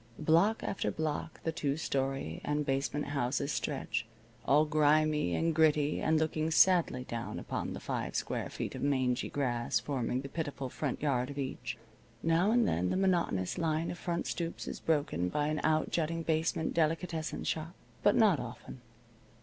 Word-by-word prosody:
Block 170 +8 +3
after 195 - -1
block 155 0 -3
the 165 - 0
two 145 -3 -1
story 135 - -2
and 150 0 0
basement 140 +2 -1
houses 140 +1 -1
stretch, - - -2 0.4
all 150 +3 +5
grimy 150 - +3
and 165 0 +1
gritty 150 -2 +3
and 160 0 +3
looking 155 0 0
sadly 165 -6 +4
down 120 -2 -5
upon - - -3
the - - -6
five - - -3
square - - -2
feet - - -4
of - - -6
mangy 130 -3 +1
grass 120 -4 0
forming 130 -2 -2
the 140 - -6
pitiful 140 -3 -4
front 140 +1 -3
yard 130 -3 +1
of 140 - -7
each. 130 -3 -4 0.5
Now 165 +4 +3
and 235 +1 +4
then 90 +2 +1
the - - 0
monotonous 175 - +1
line 160 0 0
of 175 - -7
front 170 -1 -2
stoops 170 -1 -3
is - - -5
broken 145 - 0
by 150 +8 0
an 155 0 -1
outjutting 160 +1 +1
basement 160 0 0
delicatessen 165 0 -1
shop. 165 +2 -3 0.3
But 205 - +4
not 205 - +5
often. 125 +1 -8
150 Hz, 165 wpm, -32 LUFS, 135-165 Hz, 0.5 s, all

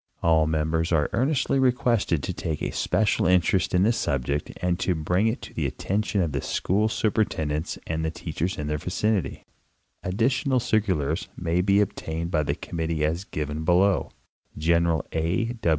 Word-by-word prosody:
All 80 -2 +4
members 80 +2 0
are 75 -3 +2
earnestly 135 +1 +1
requested 120 - +2
to - - -2
take 80 -3 -4
a - - -1
special 100 +1 +1
interest 90 -2 +2
in 90 - +4
this 115 +3 +2
subject 70 +1 -1
and 90 -1 0
to 90 - +1
bring 90 +7 +1
it 110 - -2
to - - -9
the - - -1
attention 100 -1 -1
of 80 - -2
the 70 -1 -2
school 105 +4 0
superintendents 105 -10 -1
and 80 0 -2
teachers 85 +3 -3
in 75 - -3
their 75 0 -2
vicinity. 95 -2 -1 0.6
Additional 130 +7 +1
cir 115 -2 +2
culars 80 -5 -1
may 85 0 0
be 100 +2 +4
obtained 85 -3 -3
of 75 -3 +1
the - - 0
committee 80 -2 -2
as 85 +5 -2
given 75 -1 -4
below. 90 +3 +3 0.5
General 85 0 +2
A. 90 +9 0
85 Hz, 165 wpm, -25 LUFS, 80-105 Hz, 0.6 s, All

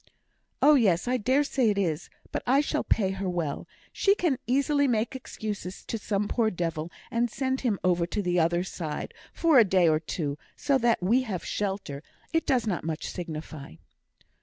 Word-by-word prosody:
"Oh, 300 - +8
yes 205 - +3
I 255 +1 +2
dare 260 +5 +2
say 260 -5 +1
it 205 - 0
is; 165 -6 -1 0.2
but - - -2
I 265 +3 +5
shall 295 - 0
pay 195 -4 +1
her 195 -1 -3
well; 165 -5 -3 0.3
she 395 0 +3
can 320 -10 0
easily 280 +3 +2
make 235 +1 0
excuses 210 -7 -6
to 225 - -3
some 205 -1 -1
poor 225 -1 +1
devil, 165 -3 -3 0.2
and 235 0 +1
send 265 +2 -2
him 230 -6 +1
over 175 -2 +2
to 205 +3 -2
the 180 -1 +1
other 170 +2 +2
side; 160 -5 -5
and, - - -21
for 325 -6 +5
a - - +8
day 185 -3 +3
or 155 -1 +3
two, 150 -3 -4 0.2
so 280 -2 +1
that 235 -6 +2
we 230 +8 +4
have 205 -8 -4
shelter, 195 -8 -3 0.3
it 325 - +1
does 250 -4 +2
not 190 -6 -1
much 160 -1 -3
signify." 155 - -7
205 Hz, 190 wpm, -27 LUFS, 175-255 Hz, 0.3 s, Oh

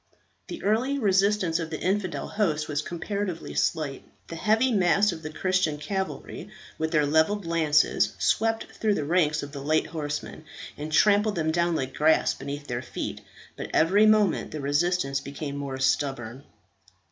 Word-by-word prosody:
The 345 - -7
early 240 +7 +1
resistance 195 -6 +2
of 165 -1 -4
the 155 - -5
infidel 190 -1 -1
host 155 -8 -1
was 145 -1 -1
comparatively 180 +2 -4
slight. 150 -5 -1 0.3
The 165 - -6
heavy 220 +8 +2
mass 200 0 +3
of 165 -2 -7
the 155 - -6
Christian 180 -2 0
cavalry, 190 +5 -5 0.3
with 160 0 0
their 150 -2 +2
levelled 160 +7 +2
lances, 160 -3 +2
swept 225 0 +1
through 215 -2 0
the 150 - -2
ranks 155 -2 +1
of 145 - -7
the 140 -1 -7
light 155 +3 +1
horsemen, 150 0 -5 0.3
and 150 +1 -6
trampled 210 +4 +4
them 160 -2 0
down 170 +1 +1
like 130 -3 -3
grass 155 +1 +3
beneath 145 +1 -7
their 120 -3 -3
feet; 130 - -6 0.3
but - - -6
every 195 +7 +5
moment 215 -2 +3
the 155 - -6
resistance 145 0 0
became 140 +1 -6
more 140 -2 -4
stubborn. 135 -2 -1
160 Hz, 160 wpm, -26 LUFS, 150-200 Hz, 0.3 s, every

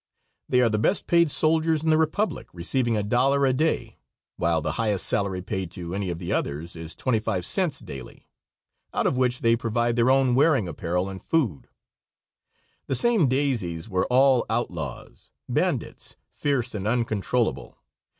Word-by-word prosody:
They 125 - +3
are 120 - +4
the 105 -1 0
best 180 - +1
paid 170 -2 +3
soldiers 160 +1 +2
in 160 - +2
the 155 - +4
Republic, 160 +7 -1
receiving 115 +7 0
$1 130 +7 +2
a 130 - +2
day, 155 +5 -1 0.4
while 85 -1 +1
the 80 0 -2
highest 105 -4 0
salary 95 -2 -1
paid 95 -2 -4
to 85 -1 -5
any 100 -1 -2
of 85 - -3
the 85 0 -4
others 75 +5 -3
is 80 0 -7
twenty 120 -4 0
five 90 -4 -2
cents 175 - +2
daily, 65 -2 -10 0.7
out - - 0
of - - +1
which 125 -1 0
they 115 0 +4
provide 120 0 -1
their 120 +1 +3
own 135 -1 +3
wearing 135 - +3
apparel 90 +3 -2
and 95 -1 -7
food. 125 - -1 1.2
The 135 - 0
same 220 - +3
"daisies" 120 - -1
were 95 -2 0
all 130 -1 +4
outlaws, 85 - -5 0.2
bandits, - - -2 0.2
fierce 135 -4 -1
and 105 -1 -4
uncontrollable. 110 - -1
115 Hz, 160 wpm, -25 LUFS, 90-135 Hz, 1.2 s, are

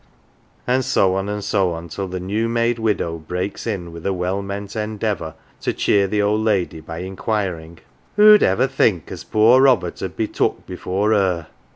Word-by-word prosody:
And 130 +1 +1
so 100 -7 +2
on, 95 +1 -2
and 105 0 -3
so 95 -4 +1
on 85 +1 -7
till 95 +4 -5
the 90 0 -5
new 105 +5 -1
made 115 0 0
widow 100 -7 -1
breaks 90 +7 -4
in 90 -6 -3
with 85 0 -10
a 100 - 0
well 90 +2 -2
meant 100 0 -6
endeavour 105 -6 -3 0.2
to - - -2
cheer 100 -1 +2
the 105 +1 0
old 105 +1 +1
lady 100 -7 0
by 80 +2 -7
inquiring, 95 -4 -3 0.2
" 65 - -36
Who'd 210 0 +8
ever 95 +7 +3
think 115 - +1
as - - -7
poor 115 +4 +4
Robert 115 -11 +2
'ud - - -5
be - - 0
took - - -1
before 95 +3 -1
her 95 -6 +1
100 Hz, 190 wpm, -20 LUFS, 90-110 Hz, 0.2 s, Who'd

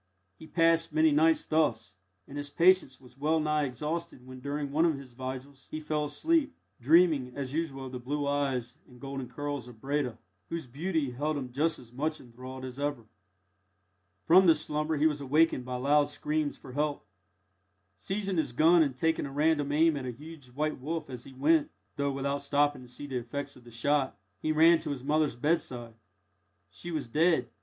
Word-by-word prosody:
He 160 - -11
passed 165 0 +3
many 155 +1 +4
nights 160 +2 +3
thus, 115 -11 0 0.3
and 140 - -10
his 145 0 -4
patience 170 -5 +3
was 125 0 -18
well 155 +3 +2
nigh 150 -1 +1
exhausted 150 +2 -4
when, 130 0 -10
during 140 +1 -3
one 155 +3 +3
of 165 -4 +2
the 140 - -9
vigils, 130 +2 -8
he 155 - -4
fell 150 -1 -1
asleep, 310 - +1 0.2
dreaming 145 -2 +4
as 135 -1 -4
usual 145 -4 -3
of 130 - -7
the 125 - -5
blue 145 +4 -2
eyes 135 -2 -1
and 125 -1 -16
golden 135 -1 -6
curls 145 -4 -4
of 120 -3 -13
Breda, 135 -1 -1 0.3
whose 165 -3 -4
beauty 150 +2 -2
held 145 +4 -1
him 130 -3 -5
just 155 +5 +1
as 120 -2 -15
much 155 +4 -2
enthralled 130 +2 -9
as 130 +1 -8
ever. 145 -5 -2 1.2
From 185 +2 +7
this 160 -2 +5
slumber 150 +1 -1
he 150 - +2
was 150 -2 +2
awakened 140 -1 +2
by 125 0 -4
loud 145 +3 +3
screams 150 0 -2
for 130 - -12
help. 145 -2 -1 0.9
Seizing 195 - -2
his 155 -6 0
gun, 165 +6 +5
and 140 -5 +1
taking 160 0 +1
a - - -8
random 145 0 +1
aim 160 +1 +4
at 135 -3 -4
a - - -2
huge 150 +2 -11
white 150 +5 -2
wolf 155 +1 -4
as 125 -1 -7
he 135 - -12
went 150 +4 +3 0.3
(though 140 -1 0
without 140 +1 -2
stopping 145 -1 +1
to 125 - -12
see 125 +4 -8
the 135 -3 -3
effects 140 +4 -6
of 125 - -17
the - - -12
shot), 130 0 0 0.2
he 155 - 0
ran 165 +2 +6
to 160 -1 -6
his 135 -3 -4
mother's 150 -2 +1
bedside. 120 -4 -1 0.8
She 175 - -8
was 155 -7 -3
dead. 160 +7 +2
145 Hz, 195 wpm, -29 LUFS, 130-155 Hz, 1.2 s, From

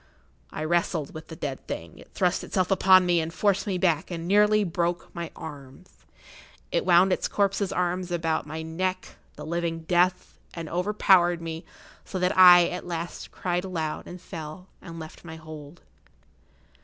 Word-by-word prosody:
I 155 - -5
wrestled 165 -2 0
with 155 0 -9
the 160 - -9
dead 140 -4 -6
thing; 85 0 -7
it - - -15
thrust 180 -1 0
itself 185 -1 -1
upon 185 -1 +6
me 175 -1 +3
and 160 +1 -4
forced 200 +2 +1
me 190 -2 0
back 170 -4 +1
and 170 -1 -5
nearly 210 +2 +4
broke 175 -1 -2
my 170 -1 -5
arms; 145 +2 -10 0.8
it - - 0
wound 180 +1 +5
its - - -1
corpse's 200 -1 0
arms 180 0 -1
about 165 -3 -1
my 160 +1 -5
neck, 185 +3 -3 0.3
the 150 - -9
living 170 0 -2
death, 180 +2 0 0.2
and 165 -2 -6
overpowered 180 -1 +3
me, 165 0 -6 0.4
so 190 - -6
that 180 0 +1
I, 180 -2 +9
at 180 0 -6
last, 170 0 -5
cried 180 -1 -2
aloud 165 -5 -4
and 180 - -9
fell, 165 0 -8 0.2
and 165 -1 -9
left 160 -1 -10
my 160 -2 -9
hold. 155 0 -11
175 Hz, 170 wpm, -26 LUFS, 160-185 Hz, 0.8 s, I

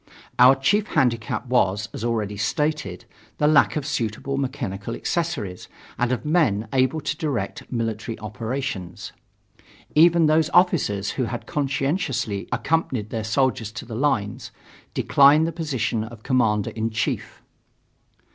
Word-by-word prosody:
Our 125 +2 +8
chief 205 +11 +1
handicap 120 - 0
was, 105 -4 +1
as - - -6
already 110 -3 -1
stated, 150 +9 -2 0.3
the 150 - +1
lack 150 0 +4
of 150 -3 -2
suitable 135 -1 -2
mechanical 120 -6 -3
accessories 150 - -3 0.3
and 120 0 +1
of 130 - -2
men 140 - +2
able 130 +4 +2
to 150 - -3
direct 140 - -3
military 115 -2 -3
operations. 110 -3 -5 0.8
Even 170 +1 +5
those 155 +1 +3
officers 150 - +3
who 130 - -1
had 120 +1 -5
conscientiously 135 - -1
accompanied 130 -10 -1
their 110 -1 -2
soldiers 115 -1 0
to 100 - -7
the 115 - -8
lines, 110 -5 -1 0.5
declined 145 +3 +5
the 165 - -1
position 130 -9 -2
of 110 -1 -10
Commander 110 -5 +1
in 110 0 -2
Chief. 115 +1 -3
125 Hz, 130 wpm, -23 LUFS, 110-150 Hz, 0.8 s, Our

